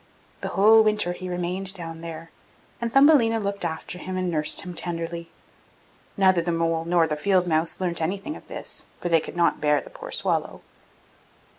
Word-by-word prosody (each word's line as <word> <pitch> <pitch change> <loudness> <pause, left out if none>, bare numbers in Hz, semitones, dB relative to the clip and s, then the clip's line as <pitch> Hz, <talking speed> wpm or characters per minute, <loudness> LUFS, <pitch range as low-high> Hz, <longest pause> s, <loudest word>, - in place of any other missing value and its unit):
The - - -3
whole 220 +3 +6
winter 210 -4 +2
he 185 +1 -7
remained 180 +2 -3
down 165 -2 -8
there, 165 0 -8 0.5
and 235 -1 -2
Thumbelina 270 -4 +5
looked 200 -2 -3
after 170 +1 -4
him 185 0 -5
and 185 -1 -1
nursed 150 -2 +1
him 180 -2 -7
tenderly. 170 0 -4 0.9
Neither 190 -3 +4
the 170 +1 -2
mole 165 -1 0
nor 170 -1 +3
the 155 -1 -2
field 185 +3 +2
mouse 160 -1 0
learnt 175 -3 -1
anything 195 - -3
of - - -13
this, - - -3
for 175 - -3
they 165 -1 +5
could 175 - -8
not 170 -1 +2
bear 150 -1 +3
the - - -12
poor - - -9
swallow. - - 0
175 Hz, 180 wpm, -24 LUFS, 165-200 Hz, 0.9 s, whole